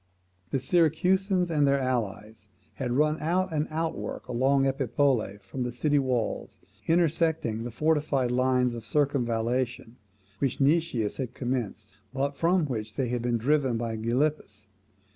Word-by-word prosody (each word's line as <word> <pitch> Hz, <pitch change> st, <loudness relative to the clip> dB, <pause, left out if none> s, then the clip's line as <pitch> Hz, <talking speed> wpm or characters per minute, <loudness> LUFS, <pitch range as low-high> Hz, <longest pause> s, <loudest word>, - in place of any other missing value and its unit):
The -, -, 0 dB
Syracusans 180 Hz, +5 st, +2 dB
and 145 Hz, -3 st, +3 dB
their 140 Hz, 0 st, +3 dB
allies 110 Hz, -4 st, -3 dB, 0.3 s
had 125 Hz, -3 st, -3 dB
run 150 Hz, +3 st, +2 dB
out 180 Hz, +3 st, 0 dB
an 150 Hz, 0 st, 0 dB
outwork 160 Hz, +1 st, -4 dB
along 135 Hz, +3 st, +2 dB
Epipolae 130 Hz, -5 st, +1 dB
from 95 Hz, +7 st, -6 dB
the 125 Hz, 0 st, -1 dB
city 145 Hz, +4 st, +1 dB
walls, 125 Hz, -4 st, -2 dB, 0.3 s
intersecting 160 Hz, -8 st, +1 dB
the 120 Hz, -, -4 dB
fortified 145 Hz, -1 st, +1 dB
lines 125 Hz, 0 st, +2 dB
of 115 Hz, -1 st, -7 dB
circumvallation 125 Hz, -2 st, -1 dB, 0.4 s
which 135 Hz, -3 st, -1 dB
Nicias 140 Hz, -7 st, +1 dB
had 125 Hz, -3 st, -4 dB
commenced, 120 Hz, -5 st, -4 dB, 0.2 s
but 140 Hz, +1 st, -1 dB
from 170 Hz, +3 st, +2 dB
which 110 Hz, -6 st, -4 dB
they 130 Hz, -3 st, -1 dB
had 120 Hz, -1 st, -1 dB
been 120 Hz, 0 st, 0 dB
driven 130 Hz, 0 st, +1 dB
by 115 Hz, -1 st, -3 dB
Gylippus. 115 Hz, -1 st, -1 dB
130 Hz, 140 wpm, -27 LUFS, 120-150 Hz, 0.4 s, and